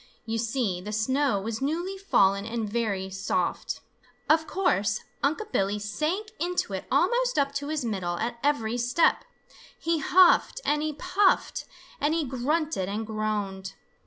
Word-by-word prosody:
You 225 0 -2
see, 225 -6 -1
the 210 +3 -6
snow 255 +2 +1
was 220 +3 -4
newly 340 +7 -1
fallen 200 - +3
and 225 0 -3
very 205 -4 -2
soft. 195 +1 -2 0.5
Of 315 0 +3
course 215 - +1 0.2
Unc' 370 +10 -1
Billy 195 +1 +1
sank 310 - -2
into 355 +1 -1
it - - -4
almost - - +2
up 280 0 +2
to 285 - -5
his 305 -4 -2
middle 185 -6 -2
at 235 +3 -3
every 245 -5 0
step. 245 +8 +3 0.5
He 330 -1 0
huffed 365 - +5
and 295 0 +2
he 310 0 -1
puffed 365 +5 +1 0.3
and 300 +2 +1
he 330 - +1
grunted 265 - -1
and 215 +2 -3
groaned. 210 -3 -3
245 Hz, 150 wpm, -27 LUFS, 210-315 Hz, 0.5 s, huffed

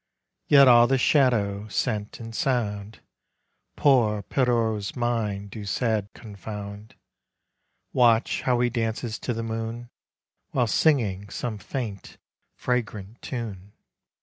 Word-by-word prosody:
Yet 140 -2 +7
all 120 -1 +7
the 135 +1 +2
shadow, 110 -7 +2
scent 105 -1 -2
and 115 -1 -8
sound 110 -5 -2 0.7
Poor 110 -7 +3
Pierrot's 115 -4 0
mind 110 -5 -2
do 105 - -7
sad 105 0 -1
confound. 105 0 -8 1.0
Watch 120 -2 +3
how 125 -2 +1
he 120 - +2
dances 115 -1 -2
to - - -3
the 115 -1 -3
moon 115 +1 -5 0.6
While 125 -2 +2
singing 110 -8 +1
some 110 -1 -4
faint 105 -1 -6 0.4
fragrant 115 -3 -3
tune 105 -6 -6
115 Hz, 110 wpm, -25 LUFS, 105-120 Hz, 1.0 s, Yet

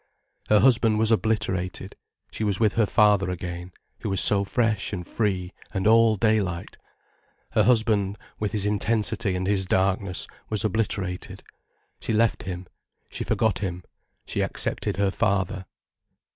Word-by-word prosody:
Her 105 -1 +5
husband 115 -4 +4
was 110 +1 +3
obliterated, 95 -5 -1 0.4
she - - -4
was 100 -2 0
with 110 -3 +3
her 115 -2 +2
father 105 -4 +3
again, 90 0 -5 0.3
who - - -4
was 95 -1 0
so 100 -1 +4
fresh 110 -1 0
and 90 -4 -4
free 95 -4 -2 0.2
and 95 - -1
all 115 0 +5
daylight. 100 -5 0 0.8
Her 110 - +3
husband, 110 -4 +2 0.2
with 105 -1 -1
his 105 -2 -1
intensity 105 -1 0
and 90 0 -2
his 95 -1 0
darkness, 95 -1 0 0.2
was 110 -1 -1
obliterated. 100 -4 -2 0.6
She - - -3
left 115 +1 +2
him, 90 0 -5 0.4
she - - -4
forgot 110 -5 +1
him, 90 -3 -4 0.4
she - - -2
accepted - - -2
her 100 -1 +2
father. 95 -1 -1
100 Hz, 145 wpm, -25 LUFS, 95-110 Hz, 0.8 s, Her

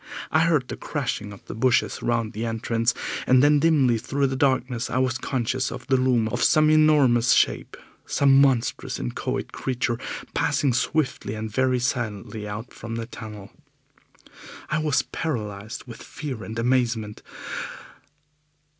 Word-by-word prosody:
I 155 - +4
heard 150 -7 +2
the - - -5
crashing 120 -8 -3
of 100 - -13
the - - -7
bushes 120 +2 +1
round 120 -1 -1
the 110 +2 -4
entrance, 115 +1 0 0.3
and 130 +1 +5
then 145 0 +5
dimly 140 -7 +3
through 135 +4 -1
the 135 0 -1
darkness 130 -3 0
I 130 - -1
was 130 -1 +1
conscious 130 0 -1
of - - -7
the 135 - +2
loom 125 -3 +2
of - - -1
some 155 -1 +5
enormous 145 -6 +5
shape, - - +1 0.3
some 140 -1 +4
monstrous 130 -4 +1
inchoate - - -3
creature, 120 -2 -2 0.3
passing 140 -4 +1
swiftly 130 -3 -1
and 110 0 -5
very 130 +2 +2
silently 110 -4 -3
out 105 +4 -7
from 115 0 -6
the 115 0 -3
tunnel. 105 -4 -9 1.2
I 155 - +1
was 150 -3 +1
paralysed 110 -7 -5
with 115 - -10
fear 130 -8 -6
and 110 +1 -7
amazement. 115 -3 0
125 Hz, 145 wpm, -24 LUFS, 115-135 Hz, 1.2 s, and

